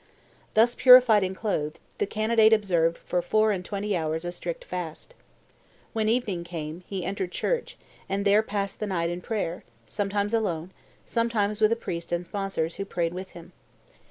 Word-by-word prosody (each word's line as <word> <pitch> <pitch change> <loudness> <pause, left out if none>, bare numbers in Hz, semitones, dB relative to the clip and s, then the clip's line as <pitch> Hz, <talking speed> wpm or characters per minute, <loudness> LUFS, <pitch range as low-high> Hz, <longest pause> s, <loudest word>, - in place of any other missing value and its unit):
"Thus 230 +2 +5
purified 250 -6 +7
and 190 0 -2
clothed, 155 -8 -2 0.2
the - - +1
candidate 220 +1 +4
observed 175 -6 +2
for 180 - -2
four 215 +5 +2
and 185 -3 -2
twenty 200 +1 -2
hours 160 0 -2
a 175 - -2
strict 175 -1 -6
fast. 180 - -6 0.8
When 220 -1 +1
evening 220 -7 0
came, 165 0 -6
he 190 -3 -4
entered 190 -1 -3
church, 485 - -2 0.3
and 200 +1 -1
there 205 +1 +5
passed 200 -2 -3
the 215 - -2
night 170 -3 -1
in 175 +1 -5
prayer, 190 -5 -3 0.2
sometimes 205 - -2
alone, 185 -6 -1 0.3
sometimes 220 -3 0
with 215 0 +5
a - - +4
priest 170 -7 -6
and 175 0 -1
sponsors, 190 -4 -3
who 195 - -2
prayed 170 -3 -2
with 185 +1 -7
him. 170 +1 -12
195 Hz, 170 wpm, -26 LUFS, 175-215 Hz, 0.8 s, purified